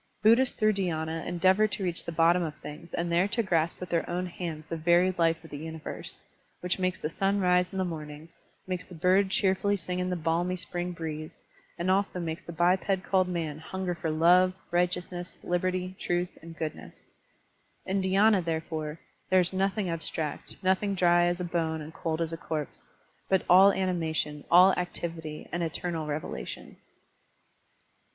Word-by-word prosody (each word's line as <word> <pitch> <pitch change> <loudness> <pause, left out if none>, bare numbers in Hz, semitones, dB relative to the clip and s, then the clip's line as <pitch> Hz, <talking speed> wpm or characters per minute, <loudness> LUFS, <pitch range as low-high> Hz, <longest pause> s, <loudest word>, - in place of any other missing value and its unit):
Buddhists 235 +4 +5
through 215 0 +3
dhyina 165 -4 -2
endeavor 185 +4 +3
to 205 - -3
reach 175 -2 -2
the - - -5
bottom 170 +2 +4
of 155 -3 -3
things 155 +4 -10
and 170 0 -1
there 175 +3 +3
to 230 +3 0
grasp 170 -4 0
with 180 - -7
their 170 -1 0
own 180 +1 -1
hands 170 -3 -6
the 165 - -4
very 175 +3 +4
life 165 -2 +1
of 160 - -13
the 145 - -6
universe, 160 0 -7 0.4
which 180 +1 -1
makes 185 0 0
the - - -2
Sim 195 +5 0
rise 180 -1 +3
in 190 - -5
the 190 - +1
morning, 155 -2 -7 0.4
makes 185 -2 -3
the 180 - -11
bird 185 +4 +3
cheerfully 195 +1 +2
sing 180 0 -3
in 180 0 -1
the 180 - 0
balmy 170 +2 0
spring 175 0 -3
breeze, 155 -2 -6 0.3
and 180 +2 +1
also 195 -1 +1
makes 165 +1 -4
the 170 - -9
biped 185 +3 +2
called 185 -1 +2
man 165 -4 -3
himger 180 +2 -3
for 165 - -3
love, 175 +4 +5 0.2
righteousness, 180 0 -1
liberty, 185 +1 -1
truth, 175 0 -1
and 165 0 -11
goodness. 155 -1 -7 0.7
In 195 +1 0
dhy^na, 195 +1 +4
therefore, 160 -1 -3 0.3
there 185 0 +5
is 180 +1 -2
nothing 195 +1 0
abstract, 160 -2 -3
nothing 190 +2 +2
dry 175 -1 +4
as 175 +1 0
a - - -2
bone 165 -2 -1
and 155 +1 -8
cold 165 0 -2
as 165 0 -2
a - - -3
corpse, 155 -3 -5 0.4
but 190 -1 +2
all 190 +3 +8
animation, 160 -6 -1
all 180 +2 +7
activity, 165 -3 -4
and 175 - -2
eternal 165 -1 -2
revelation. 150 +1 -5
175 Hz, 175 wpm, -28 LUFS, 165-185 Hz, 0.7 s, all